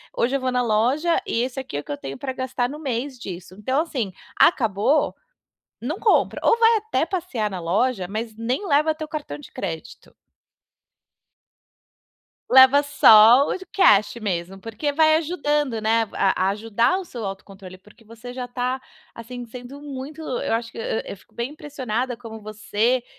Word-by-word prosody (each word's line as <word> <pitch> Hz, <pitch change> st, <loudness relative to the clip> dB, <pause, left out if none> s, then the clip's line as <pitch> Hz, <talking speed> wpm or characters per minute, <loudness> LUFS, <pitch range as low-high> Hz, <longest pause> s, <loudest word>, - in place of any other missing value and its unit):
"Hoje 255 Hz, +4 st, +1 dB
eu -, -, +1 dB
vou 260 Hz, -1 st, -1 dB
na 250 Hz, 0 st, +1 dB
loja 250 Hz, +10 st, +2 dB
e 230 Hz, -, 0 dB
esse 260 Hz, +1 st, -4 dB
aqui 260 Hz, -, -5 dB
é -, -, -1 dB
o -, -, -19 dB
que -, -, -8 dB
eu 145 Hz, -, -3 dB
tenho 135 Hz, 0 st, -7 dB
pra 265 Hz, -2 st, -4 dB
gastar 255 Hz, -1 st, -2 dB
no 295 Hz, +3 st, -7 dB
mês 260 Hz, -2 st, -3 dB
disso". 185 Hz, -4 st, -8 dB
Então, 260 Hz, +8 st, +1 dB
assim, 250 Hz, -, -3 dB, 0.2 s
acabou, 225 Hz, -, +3 dB, 0.7 s
não 300 Hz, -, -3 dB
compra, 435 Hz, -, +2 dB
ou 460 Hz, -, +4 dB
vai 455 Hz, 0 st, +5 dB
até 435 Hz, +1 st, -1 dB
passear 330 Hz, -, -2 dB
na 190 Hz, -2 st, -5 dB
loja, 190 Hz, +4 st, 0 dB
mas 220 Hz, +3 st, -5 dB
nem 250 Hz, -, -2 dB
leva 305 Hz, +1 st, +3 dB
teu 310 Hz, -1 st, -6 dB
cartão 300 Hz, -, -6 dB
de -, -, -13 dB
crédito. 180 Hz, +4 st, -7 dB, 2.4 s
Leva 265 Hz, +2 st, +7 dB
só 245 Hz, -2 st, +7 dB
o -, -, -1 dB
d 375 Hz, -, -12 dB
cash 210 Hz, -, +4 dB
mesmo 190 Hz, -2 st, -3 dB
porque 230 Hz, +8 st, -3 dB
vai 315 Hz, +1 st, +5 dB
ajudando, 295 Hz, -7 st, -1 dB
né, 225 Hz, +1 st, +2 dB
a 195 Hz, -, +2 dB
a -, -, +3 dB
ajudar 225 Hz, -, +1 dB
o 380 Hz, -, -7 dB
seu 240 Hz, -9 st, -7 dB
autocontrole 195 Hz, -1 st, -8 dB
porque 210 Hz, +3 st, -21 dB
você 230 Hz, +3 st, -10 dB
já 250 Hz, -1 st, -5 dB
tá, 250 Hz, +1 st, -2 dB, 0.4 s
assim, 245 Hz, +1 st, -8 dB
sendo 250 Hz, +4 st, -10 dB
muito 290 Hz, +2 st, -7 dB
eu 255 Hz, -7 st, -2 dB
acho 230 Hz, 0 st, -2 dB
que -, -, -13 dB
e 225 Hz, -1 st, -2 dB
e -, -, -5 dB
eu -, -, -8 dB
fico 185 Hz, -, -25 dB
bem 235 Hz, +3 st, -4 dB
impressionada 260 Hz, -5 st, -4 dB
como 225 Hz, -2 st, -10 dB
você 215 Hz, +3 st, -1 dB
245 Hz, 180 wpm, -23 LUFS, 215-285 Hz, 2.4 s, Leva